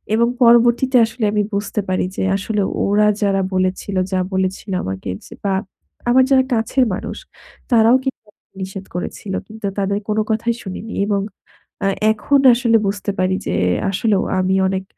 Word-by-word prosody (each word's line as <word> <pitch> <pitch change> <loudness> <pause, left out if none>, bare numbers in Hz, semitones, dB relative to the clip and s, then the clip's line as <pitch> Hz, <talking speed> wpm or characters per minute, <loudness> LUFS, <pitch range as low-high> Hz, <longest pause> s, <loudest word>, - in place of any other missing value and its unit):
এবং 235 +1 +3 0.2
পরবর্তীতে 240 +2 +5
আসলে 225 0 -6
আমি 210 - +2
বুঝতে 205 +1 -1
পারি 185 -1 0
যে - - -1
আসলে 205 +1 -2 0.2
ওরা 210 +1 +3 0.2
যারা 195 -1 +2
বলেছিল, 185 +1 -1 0.2
যা 185 - +1
বলেছিল 190 +1 -2
আমাকে 95 0 -5 0.2
যে - - -11
বা 195 - +1 0.6
আমার 260 +1 +5
যারা 260 -1 +5
কাছের 240 +3 +2
মানুষ, - - -5 0.5
তারাও 230 +1 +5
কি 265 - +1 0.5
নিষেধ 190 0 -6
করেছিল। 190 +2 -5
কিন্তু 220 -1 -9
তাদের 200 +1 0
কোনো 215 +1 +1
কথাই 230 +1 0
শুনিনি। 205 +3 -7
এবং 200 -2 +1 0.6
আ - - +3 0.3
এখন 275 +6 +2 0.2
আসলে 230 -2 +3
বুঝতে 200 0 -2
পারি 185 0 +1
যে - - -1 0.4
আসলেও 200 0 +1 0.2
আমি 190 +1 +1
অনেক 190 0 -2
205 Hz, 155 wpm, -19 LUFS, 190-230 Hz, 0.6 s, পরবর্তীতে